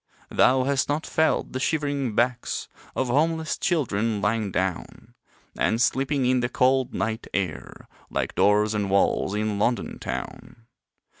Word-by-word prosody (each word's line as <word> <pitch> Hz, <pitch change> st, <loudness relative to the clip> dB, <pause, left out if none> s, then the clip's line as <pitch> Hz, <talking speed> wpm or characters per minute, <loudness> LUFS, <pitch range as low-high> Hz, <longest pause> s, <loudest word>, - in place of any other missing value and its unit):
Thou 130 Hz, 0 st, +4 dB
hast 140 Hz, +1 st, 0 dB
not 150 Hz, +2 st, -1 dB
felt 160 Hz, 0 st, +1 dB
the 130 Hz, -, -2 dB
shivering 140 Hz, -5 st, -1 dB
backs 120 Hz, +2 st, 0 dB, 0.3 s
Of 130 Hz, -, 0 dB
homeless 155 Hz, +2 st, +1 dB
children 115 Hz, -, 0 dB
lying 105 Hz, 0 st, 0 dB
down 95 Hz, -1 st, -3 dB, 0.4 s
And 110 Hz, -, +1 dB
sleeping 135 Hz, +2 st, +1 dB
in 125 Hz, 0 st, +3 dB
the 120 Hz, 0 st, -1 dB
cold, 130 Hz, +1 st, +2 dB
night 110 Hz, 0 st, -3 dB
air 90 Hz, -7 st, -4 dB, 0.2 s
Like -, -, -2 dB
doors 105 Hz, +1 st, +3 dB
and 105 Hz, -2 st, -1 dB
walls 100 Hz, 0 st, +2 dB
in 105 Hz, -1 st, -1 dB
London 120 Hz, +3 st, -1 dB
town. 115 Hz, -, -7 dB
120 Hz, 140 wpm, -25 LUFS, 105-140 Hz, 0.4 s, Thou